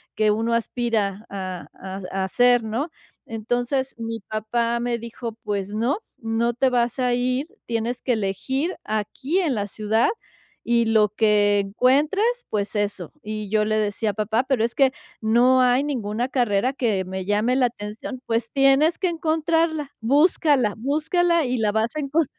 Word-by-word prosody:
que 215 -1 +3
uno 225 +2 0
aspira 225 -3 -1
a 185 -3 -5
a 190 +1 -7
a 195 0 -1
hacer, 245 +4 +3
¿no? 235 +9 -2 0.4
Entonces, 245 +4 -2
mi 230 0 -4
papá 230 +3 -1
me 240 0 -1
dijo: 230 0 -6
"Pues 205 -1 -3
no, 235 - +1 0.2
no 230 +1 0
te 265 +2 +3
vas 240 0 +1
a 250 -1 +2
ir. 250 +3 0 0.2
Tienes 235 +2 -2
que 250 - +1
elegir 260 - -2
aquí 220 - -2
en 330 -8 +1
la 205 -1 -2
ciudad 215 +3 +1 0.5
y 235 -1 +2
lo 220 -2 +3
que 210 -1 +3
encuentres, 265 - +2 0.2
pues 210 0 -2
eso". 200 -5 -2
Y 215 -1 -5
yo 215 -1 +3
le 215 0 0
decía: 210 0 0
"Papá, 220 +3 0
pero 260 -4 +1
es 235 - 0
que 270 -2 +4 0.3
no 245 +4 +4
hay 250 +2 +4
ninguna 240 -3 -2
carrera 245 -1 +1
que 215 -8 0
me 190 0 -4
llame 210 +5 +1
la 255 -2 +4
atención. 220 +3 -7
'Pues 230 0 -1
tienes 275 +4 +4
que 370 - 0
encontrarla, 320 -2 0
búscala, 280 - +3
búscala 320 +6 +1
y 250 0 -1
la 215 -2 +2
vas 220 +5 0
a - - -1
encon...'" 300 +2 +1
235 Hz, 165 wpm, -23 LUFS, 215-265 Hz, 0.5 s, que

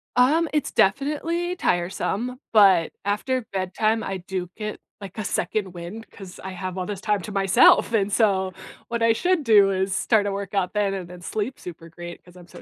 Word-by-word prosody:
Um, 300 +7 +4
it's 300 - 0
definitely 320 - 0
tiresome, 200 - -1
but, 195 -6 +5
after 225 +5 -1
bedtime 215 +4 0
I 195 -1 -3
do 180 0 -5
get, 215 -1 -5 0.2
like, 195 +2 -9
a 215 - -3
second 190 +1 -2
wind 180 +6 -8
'cause 190 -3 -11
I 190 - -5
have 185 0 -6
all 180 - -2
this 200 -1 -5
time 210 -3 0
to 210 - -7
myself, 195 +3 +4
and 205 -2 +1
so 190 -4 +2 0.4
what 235 0 -2
I 230 0 +4
should 355 +4 +1
do 205 -4 +5
is 190 0 -1
start 210 -3 +2
a - - -1
workout 195 -1 -2
then 205 -2 +1
and 180 -3 -5
then 180 -1 -11
sleep 220 +8 -4
super 165 -1 -10
great 175 +1 -10
'cause 175 0 -18
I'm 175 -1 -14
so - - -13
200 Hz, 195 wpm, -24 LUFS, 185-225 Hz, 0.4 s, but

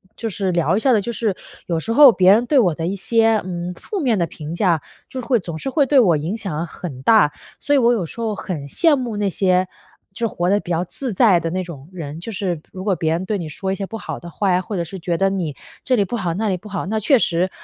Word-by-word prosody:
就 225 - -4
是 195 -2 -2
聊 170 +2 +1
一 - - +2
下 260 +3 +2
的 215 - +3
就 235 - -4
是， 220 -4 -1 0.3
有 170 -2 -1
时 220 - -4
候 275 +2 +9
别 185 -3 +5
人 230 +4 +4
对 280 +2 +3
我 180 -9 +3
的 165 - -3
一 195 - -2
些， 225 +2 +2
嗯， 180 -1 -4
负 400 - -5
面 250 - +1
的 170 - +1
评 155 0 -8
价， 175 -4 +2 0.3
就 260 - -6
是 250 - -6
会 245 -4 +2
总 170 -4 -6
是 270 - -4
会 285 0 +3
对 275 +1 +4
我 185 -9 +5
影 165 +9 -3
响 175 -6 -3
很 150 -6 -8
大， 210 -3 +5 0.3
所 290 - +1
以 - - +5
我 240 -1 +4
有 200 -7 -1
时 230 - -8
候 220 -2 -1
很 155 -8 -5
羡 315 - +3
慕 245 -5 -3
那 205 -1 0
些 185 0 +1 0.5
就 230 +4 -1
活 175 -4 -1
得 205 +2 +3
比 175 - -11
较 170 +1 +1
自 245 +6 -4
在 195 -3 +5
的 165 0 -3
那 185 +1 -2
种 155 -5 -10
人， 155 -3 -6
就 225 +7 -7
是 180 -4 -2
如 185 - -7
果 200 -2 +1
别 160 -2 -1
人 175 +3 -2
对 205 +1 -1
你 170 - -5
说 190 +5 -4
一 - - -1
些 195 - -4
不 225 - -8
好 - - -6
的 175 - -10
话 195 +2 0
呀， 180 0 +2
或 205 - -6
者 175 - -1
是 185 +3 -8
觉 170 0 -2
得 195 +2 +2
你 175 -7 -3 0.3
这 255 - +2
里 205 - +3
不 215 - -4
好 180 -5 -2
那 215 +4 -1
里 185 - 0
不 205 - -13
好， 195 -2 -3
那 220 +1 -1
确 265 +6 +4
实， 180 -4 +1
190 Hz, 310 characters per minute, -20 LUFS, 170-225 Hz, 0.5 s, 候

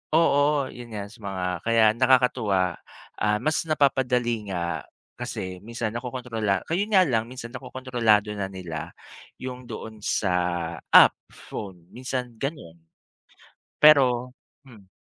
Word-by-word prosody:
oo, 145 -3 +3
yun 120 -2 -10
nga 100 -1 -5
sa 115 - -16
mga 95 -3 -4 0.2
kaya 115 -1 +4
nakakatuwa, 120 -8 +2 0.4
ah, 105 0 +1
mas 155 -1 +1
napapadali 125 -6 +1
nga 85 -4 -3 0.4
kasi 95 -1 -5
minsan 115 -1 -4
nakokontrola 120 -4 -2
ka-yun 200 +6 -1
nga 185 - +7
lang 115 -3 0
minsan, 120 -2 -8
nakokontrolado 120 -5 0
na 100 -1 -3
nila 85 -5 -6 0.5
yung 130 0 -6
doon 110 -1 -8
sa 95 -4 0 0.6
app - - +9 0.2
phone 90 -4 -9
minsan 125 -1 -4
ganun, 135 - -5 1.0
pero, 125 -5 +5 0.3
hmm 110 -8 -17
120 Hz, 120 wpm, -25 LUFS, 105-130 Hz, 1.0 s, app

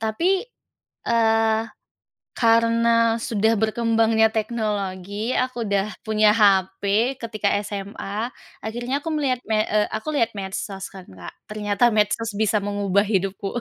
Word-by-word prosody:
Tapi, 340 - +1 0.7
eee, 225 -1 +3 0.7
karena 230 0 +3
sudah 220 0 +1
berkembangnya 225 0 +2
teknologi, 210 -1 -2
aku 255 -2 -1
udah 200 -1 +1 0.2
punya 215 -1 +3
HP, 195 -3 +3 0.4
ketika 215 -3 -3 0.2
SMA, 205 +2 -5 0.4
akhirnya 240 +5 -2
aku 325 +3 -5
melihat 275 -4 0
me 215 -1 +2
eee, 210 -1 +1
aku 220 +7 -4
lihat 230 -6 +1
medsos 195 0 -5
kan, 190 -2 -12
Kak. 90 -2 -11
Ternyata 210 +2 +1
medsos 215 +2 +1
bisa 210 0 +1
mengubah 200 0 0
hidupku. 195 0 -2
220 Hz, 120 wpm, -23 LUFS, 200-230 Hz, 0.7 s, eee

